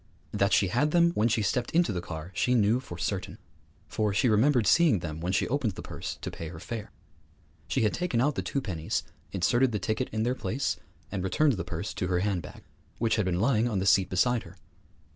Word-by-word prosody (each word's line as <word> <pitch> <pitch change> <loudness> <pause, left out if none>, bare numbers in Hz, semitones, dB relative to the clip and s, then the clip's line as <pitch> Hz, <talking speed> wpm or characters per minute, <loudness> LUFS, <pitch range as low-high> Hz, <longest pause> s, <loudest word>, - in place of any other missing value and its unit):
That 100 +1 +1
she 95 - +3
had 130 +9 +2
them 170 +1 +4
when 115 -8 +2
she 110 -2 +1
stepped 120 +5 0
into 170 -9 +3
the 90 - -2
car 85 0 -7
she 125 +7 +1
knew 110 +1 +3
for 130 - -9
certain, 95 -2 -3 0.5
for 105 -1 0
she 115 - +3
remembered 120 +2 +3
seeing 165 - +5
them 80 -2 -5
when 90 +2 -1
she 95 - +1
opened 125 -6 0
the - - -8
purse - - -6
to - - -3
pay 80 - -7
her 80 0 -8
fare. 110 +3 -6 0.8
She - - 0
had 105 - +2
taken 175 -10 -1
out 145 +5 +2
the - - -2
two 140 - -2
pennies, 85 -5 -2 0.3
inserted 120 +7 +2
the - - +1
ticket 110 +1 -2
in 110 0 -1
their 125 +2 +1
place, 130 +1 -2 0.3
and 95 -2 -3
returned 140 +10 +2
the 95 -7 -3
purse 85 +3 -5
to 90 - -2
her 90 -1 +1
handbag, 95 -6 -3 0.3
which 115 -1 +1
had 105 - +1
been 90 -1 0
lying 115 +1 +2
on 105 - -1
the 95 - 0
seat 95 -2 +4
beside 120 +6 +2
her. 95 - -13
105 Hz, 225 wpm, -28 LUFS, 95-125 Hz, 0.8 s, seeing